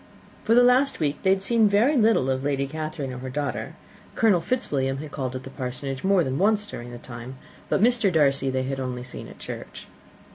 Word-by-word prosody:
For 225 Hz, -, +3 dB
the 245 Hz, -, +7 dB
last 255 Hz, +3 st, +4 dB
week 145 Hz, -1 st, -1 dB
they 190 Hz, -, +2 dB
had 190 Hz, 0 st, +3 dB
seen 225 Hz, 0 st, +3 dB
very 225 Hz, +9 st, +3 dB
little 220 Hz, -, +3 dB
of 130 Hz, -, 0 dB
either 140 Hz, +2 st, -2 dB
Lady 140 Hz, -1 st, 0 dB
Catherine 155 Hz, -2 st, -5 dB
or 125 Hz, -, -6 dB
her 130 Hz, +1 st, -6 dB
daughter. 145 Hz, +2 st, -3 dB, 0.4 s
Colonel 205 Hz, -6 st, +3 dB
Fitzwilliam 140 Hz, -, -1 dB
had 150 Hz, +1 st, -7 dB
called 130 Hz, -3 st, -4 dB
at 130 Hz, -, -5 dB
the 135 Hz, -, -9 dB
Parsonage 130 Hz, 0 st, -5 dB
more 190 Hz, -2 st, +3 dB
than 130 Hz, 0 st, -2 dB
once 210 Hz, +2 st, +3 dB
during 120 Hz, -11 st, -8 dB
the 120 Hz, -, -8 dB
time, 120 Hz, +1 st, -9 dB, 0.3 s
but 195 Hz, -, +2 dB
Mr. 230 Hz, -4 st, +3 dB
Darcy 140 Hz, -4 st, +2 dB
they 130 Hz, 0 st, -1 dB
had 135 Hz, +1 st, -3 dB
only 125 Hz, -1 st, -4 dB
seen 125 Hz, -, -9 dB
at -, -, -13 dB
church. -, -, -8 dB
145 Hz, 220 wpm, -25 LUFS, 130-205 Hz, 0.4 s, the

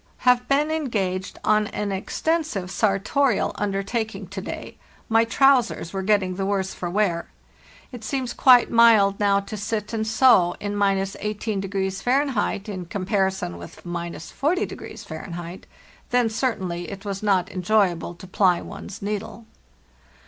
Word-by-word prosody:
"Have 250 Hz, 0 st, +4 dB
been 295 Hz, +3 st, +2 dB
engaged 200 Hz, -12 st, -2 dB
on 215 Hz, 0 st, +3 dB
an 205 Hz, -1 st, -3 dB
extensive 205 Hz, -, -2 dB
sartorial 210 Hz, +6 st, +1 dB
under 195 Hz, -1 st, -2 dB
taking 220 Hz, -2 st, -3 dB
to 190 Hz, 0 st, -5 dB
day; -, -, -7 dB, 0.3 s
my 225 Hz, +1 st, +4 dB
trousers 245 Hz, -7 st, +3 dB
were 195 Hz, -, -2 dB
getting 190 Hz, -2 st, +1 dB
the 195 Hz, -, -1 dB
worse 195 Hz, -1 st, -1 dB
for 175 Hz, -, -4 dB
wear. 175 Hz, -3 st, 0 dB, 0.6 s
It 245 Hz, -3 st, -9 dB
seems 255 Hz, +1 st, -2 dB
quite 250 Hz, -3 st, +6 dB
mild 220 Hz, -4 st, +5 dB
now 200 Hz, -1 st, +3 dB
to 200 Hz, +2 st, -7 dB
sit 210 Hz, +1 st, -3 dB
and 220 Hz, -1 st, -1 dB
sew 220 Hz, -6 st, +5 dB
in 205 Hz, 0 st, -3 dB
—18° 195 Hz, -1 st, -1 dB
Fahr. 250 Hz, -6 st, 0 dB
in 185 Hz, -2 st, -5 dB
comparison 190 Hz, -, -1 dB
with 85 Hz, -, -11 dB
—4o 170 Hz, -1 st, -6 dB, 0.7 s
Fahr. 175 Hz, 0 st, -7 dB, 0.5 s
Then 245 Hz, -2 st, +2 dB
certainly 185 Hz, -8 st, -2 dB
it 200 Hz, 0 st, -8 dB
was 195 Hz, -1 st, -4 dB
not 195 Hz, -2 st, +1 dB
enjoyable 185 Hz, -3 st, +1 dB
to 185 Hz, -, -12 dB
ply 180 Hz, -1 st, +2 dB
one's 195 Hz, -, -9 dB
needle. 210 Hz, +2 st, -4 dB
200 Hz, 135 wpm, -24 LUFS, 190-225 Hz, 0.7 s, quite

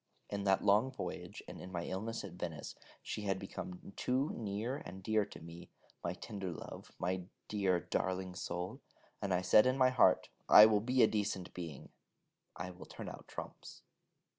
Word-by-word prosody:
In 100 Hz, -1 st, -2 dB
that 95 Hz, -1 st, +3 dB
long 105 Hz, +6 st, +5 dB
voyage, 130 Hz, -, -6 dB
and -, -, -8 dB
in 90 Hz, -, -8 dB
my 85 Hz, -2 st, -2 dB
illness 110 Hz, +5 st, -3 dB
at 100 Hz, -, -6 dB
Venice, 85 Hz, -4 st, -5 dB, 0.3 s
she -, -, -4 dB
had 95 Hz, -2 st, 0 dB
become 95 Hz, 0 st, -7 dB
too 130 Hz, +4 st, +1 dB
near 110 Hz, +4 st, -2 dB
and 95 Hz, -7 st, -9 dB
dear 110 Hz, +1 st, +2 dB
to -, -, -10 dB
me, 85 Hz, +1 st, -10 dB, 0.3 s
my -, -, -1 dB
tender 100 Hz, -3 st, -5 dB
love, 85 Hz, -, -8 dB
my 90 Hz, 0 st, -1 dB, 0.2 s
dear 95 Hz, -4 st, +2 dB
darling 95 Hz, 0 st, -1 dB
soul; 90 Hz, -1 st, -4 dB, 0.4 s
and 100 Hz, -, -1 dB
I 90 Hz, 0 st, +2 dB
said 105 Hz, +6 st, +7 dB
in 130 Hz, +1 st, +2 dB
my 130 Hz, -1 st, +5 dB
heart: 115 Hz, -7 st, +5 dB, 0.2 s
'I 105 Hz, -, +12 dB
will 105 Hz, -1 st, +4 dB
be 125 Hz, +2 st, +4 dB
a -, -, +8 dB
decent 105 Hz, -4 st, -1 dB
being: 80 Hz, -6 st, -7 dB, 0.7 s
I 90 Hz, +3 st, -5 dB
will 90 Hz, -, -11 dB
turn -, -, -7 dB
out -, -, -10 dB
trumps.' -, -, -8 dB
95 Hz, 180 wpm, -35 LUFS, 90-110 Hz, 0.7 s, I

